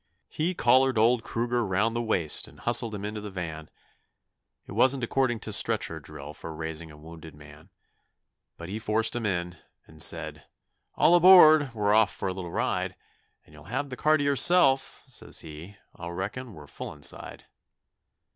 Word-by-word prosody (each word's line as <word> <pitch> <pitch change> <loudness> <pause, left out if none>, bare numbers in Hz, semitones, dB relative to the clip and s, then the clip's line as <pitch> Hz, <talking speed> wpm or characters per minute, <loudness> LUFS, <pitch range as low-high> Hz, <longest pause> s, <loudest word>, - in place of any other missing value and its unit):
He 170 +4 -2
collared 130 0 +3
old 115 +2 +3
Kruger 120 +1 -1
round 105 +3 0
the 120 - -1
waist 90 -9 0
and - - -16
hustled 120 -2 0
him 100 0 -6
into 105 0 -5
the 105 - -7
van. 80 -5 -7 1.0
It - - -13
wasn't 130 -1 +2
according 120 -1 0
to - - -2
stretcher - - +1
drill 70 +2 -10
for 80 +1 -9
raising 80 +1 -6
a 75 - -14
wounded 80 0 -12
man; 75 +3 -16 0.9
But 85 - -9
he 105 +4 -5
forced 110 +1 0
him 115 -3 -2
in 90 -2 -3 0.3
and - - -6
said, - - -1 0.5
'All 170 - +4
aboard, 155 -7 +7
we're 105 -1 +1
off 110 -3 +4
for - - -5
a 95 - -2
little 90 -2 -7
ride, - - -2 0.5
And 75 - -21
you'll 75 -1 -15
have 130 - -4
the - - -4
car 155 +4 +2
to 145 - -2
yourself,' 140 0 +2
says - - -6
he, 80 +6 -11 0.2
'I 85 - -8
reckon 100 +6 -6
we're 75 - -12
full - - -8
inside.' 70 -1 -6
105 Hz, 175 wpm, -27 LUFS, 85-130 Hz, 1.0 s, aboard